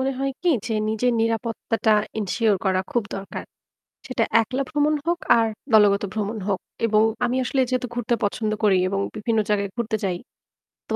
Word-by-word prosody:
মনে 270 +1 0
হয় 275 0 0
কি 360 - +2 0.2
যে 225 - -1
নিজের 220 +3 +1
নিরাপত্তাটা 225 -1 0 0.3
এনশিওর 210 0 +1
করা 185 -1 +2
খুব 240 - +2
দরকার। 195 0 -6 0.6
সেটা 255 -3 0 0.2
একলা 255 +5 -2
ভ্রমণ 300 0 +2
হোক 345 +1 0 0.2
আর 225 -1 +3 0.3
দলগত 205 -2 +5
ভ্রমণ 215 +1 -2
হোক। 195 -3 0 0.3
এবং 215 -1 +3 0.2
আমি 245 +1 0
আসলে 265 +2 +1
যেহেতু 255 -1 -1
ঘুরতে 240 0 0
পছন্দ 215 +1 -1
করি 200 -3 +5
এবং 195 0 -1 0.2
বিভিন্ন 220 +1 0
জায়গায় 200 -1 +1
ঘুরতে 230 -2 -1
যাই। 185 -3 0 0.7
তো - - 0
225 Hz, 170 wpm, -23 LUFS, 210-250 Hz, 0.7 s, দলগত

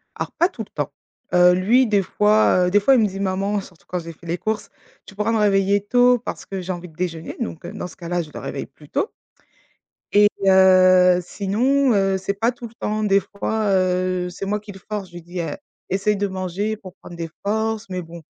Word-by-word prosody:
Alors - - -4
pas 345 - +2
tout 230 - -6
le 210 - -14
temps, 145 -2 -4 0.4
heu, 180 0 +6
lui 230 +8 +3
des 205 -3 +2
fois, 210 -1 +3
heu, - - 0
des 205 +2 +4
fois 270 +7 +5
il 250 - +4
me 215 - +4
dit: 195 -1 -5
«Maman» 195 +1 0
surtout 175 -3 -17
quand 180 - -2
j'ai 165 -1 -7
fait 170 +2 -17
les 170 +1 -1
courses: 215 +3 -3 0.4
«Tu - - -13
pourras 210 +3 0
me 225 - +2
réveiller 200 -1 +3
tôt 245 +3 +4
parce 240 - -6
que 195 -1 -5
j'ai 185 +1 -4
envie 180 0 -7
de 160 - -20
déjeuner», 165 -2 -4
donc 220 -8 -5
heu, - - -6
dans - - -5
ce 180 - -12
cas-là, 175 0 -2
je 155 -3 -6
le - - -7
réveille 135 - -5
plus 145 +2 -19
tôt. 410 - -1 1.0
Et 205 0 +7 0.2
heu, 185 -1 +6
sinon, 240 +9 +1
heu, 195 -1 +2
c'est 190 +1 -2
pas 225 +5 +1
tout 240 0 -9
le 225 - -22
temps. 215 -1 -2
Des 200 -2 +4
fois, 210 +2 -2
heu, 185 -1 +1
c'est 180 +2 -6
moi 210 +2 -1
qui 210 0 -11
le 190 - -12
force, 205 0 -6
je 175 - -20
lui 175 - -8
dis 175 +2 -6
heu: 165 - -3 0.3
«Essaye 195 +2 +1
de 205 - +1
manger 190 +3 -3
pour 185 -4 -12
prendre 175 - -12
des 165 -1 -5
forces» 220 +1 -1
mais 185 -1 -4
bon, 170 0 -11
195 Hz, 240 wpm, -22 LUFS, 180-210 Hz, 1.0 s, Et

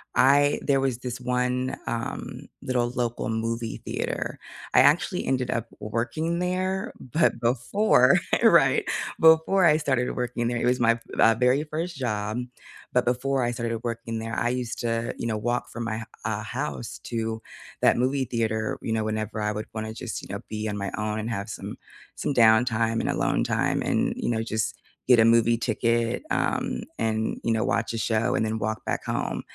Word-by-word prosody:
I 145 +2 +5
there 135 -1 +3
was 135 -3 0
this 125 0 -5
one, 125 +1 0
um, 115 0 -4 0.2
little 120 -2 0
local 120 -2 -2
movie 115 +1 -2
theater. - - -3 0.3
I - - +7
actually - - +3
ended 125 -2 0
up 115 0 -2
working 140 +11 -2
there, 185 +4 -1
but 155 0 +1
before 125 - +4 0.3
Right, - - +5 0.3
before 160 +4 +5
I 155 -2 +6
started 130 -5 0
working 120 -1 -2
there, 120 0 -1
it - - -1
was 125 0 +2
my, 115 0 +4
v 115 -1 +2
very 130 +4 +3
first 165 +3 -4
job, 110 -3 -2 0.5
but - - +3
before 130 +2 +1
I 120 - 0
started 115 -1 -3
working 115 -1 -3
there 115 0 -5
I 120 - +1
used 125 -2 -3
to, 115 -1 -1
you 115 - -2
know, 110 -2 -1
walk 120 +3 -1
from 120 - -5
my 110 -1 -2
h 115 - -5 0.2
uh, 110 -1 -1
house 120 0 -4
to 115 -1 -2 0.4
that - - +6
movie 130 +2 +1
theater, 110 -2 -1
you 115 - -3
know, 110 - 0
whenever 110 0 -3
I 105 0 0
would 105 +1 -5
wanna 110 0 -4
just, 115 -3 -5
you - - -9
know, 100 - -3
be 110 0 -3
on 105 - -3
my 100 0 -3
own 105 0 -2
and 110 +2 -3
have 100 -3 -3
some, - - -6 0.4
some - - -2
downtime 115 -1 +4
and - - -2
alone - - +1
time, - - 0
and, - - +1
you - - -2
know, 110 -1 0
just 110 -1 -2 0.3
get 125 -3 +6
a 110 - +6
movie 115 0 +4
ticket, 115 0 0
um, - - 0 0.2
and, 110 0 -1
you 115 - +1
know, 110 - +1
watch 115 +1 0
a - - -2
show 110 +1 +1
and 110 - +1
then 110 0 -2
walk 110 +1 -3
back - - -2
home. - - -2
115 Hz, 190 wpm, -26 LUFS, 110-125 Hz, 0.5 s, I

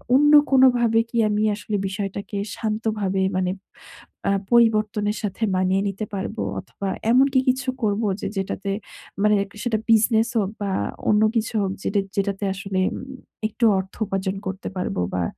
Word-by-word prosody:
অন্য 295 +2 +5 0.2
কোনোভাবে 245 -4 +5
কি 235 - -4
আমি 210 +1 +1
আসলে 210 0 -4
বিষয়টাকে 200 +1 -4 0.2
শান্তভাবে 215 -3 -1 0.2
মানে 185 -1 0 0.8
আ - - +3 0.2
পরিবর্তনের 215 -2 +3
সাথে 205 +2 -3
মানিয়ে 185 +1 +2
নিতে 200 +2 -4
পারবো 190 - -3 0.2
অথবা, 195 - -6 0.2
এমনকি 265 +1 +4
কিছু 260 +1 0
করবো 210 +1 +1
যে, - - -2
যেটাতে 195 +1 -3 0.5
মানে 210 0 +5
এক 200 - -12
সে 210 - -12
সেটা 225 -3 0
বিজনেস 225 +1 +4
হোক 200 -1 0
বা, 200 -1 -1 0.4
অন্য 210 0 +4
কিছু 225 +1 0
হোক 190 - -1
যেটা 200 0 +1 0.2
যেটাতে 200 0 -1
আসলে 195 -1 -3 0.2
উম - - -6 0.5
একটু 230 +2 -1
অর্থ 190 +1 -6
উপার্জন 195 0 -2
করতে 190 +1 -5
পারবো 135 - -2
বা, 90 -1 0
210 Hz, 155 wpm, -23 LUFS, 195-225 Hz, 0.8 s, অন্য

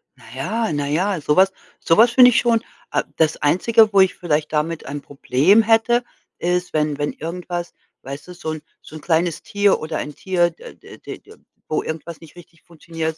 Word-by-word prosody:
Na - - -21
ja, 215 - -2
na 145 -1 -2
ja, 180 +4 0
so 150 +1 +1
was 190 +1 +5 0.3
so 165 - +2
was 230 +4 +6
finde 250 0 +7
ich - - +3
schon 230 -1 +1 0.3
a - - 0
das 155 -1 +2
Einzige, 215 +8 +3
wo 200 - +5
ich 190 - +2
vielleicht 155 -3 -1
damit 155 +1 -2
ein 145 +1 -5
Problem 145 - +2
hätte, 225 +2 +2 0.4
ist, 180 +1 -1
wenn 150 -2 0
wenn 145 0 -2
irgendwas, 175 +2 -6 0.3
weißt 140 +4 -9
du, - - -8
so 175 -2 -7
'n 155 -1 -6 0.2
so - - -13
'n 155 - -9
kleines 165 +1 0
Tier 205 -1 +2
oder 155 0 -4
ein 150 - -6
Tier, 175 -2 +1
d 165 - -13
d - - -15
d - - -9
d - - -17 0.3
wo 155 - -1
irgendwas 160 +1 -7
nicht 165 -1 -15
richtig 170 -1 -17
funktioniert, 165 -1 -6
170 Hz, 205 wpm, -20 LUFS, 155-195 Hz, 0.4 s, finde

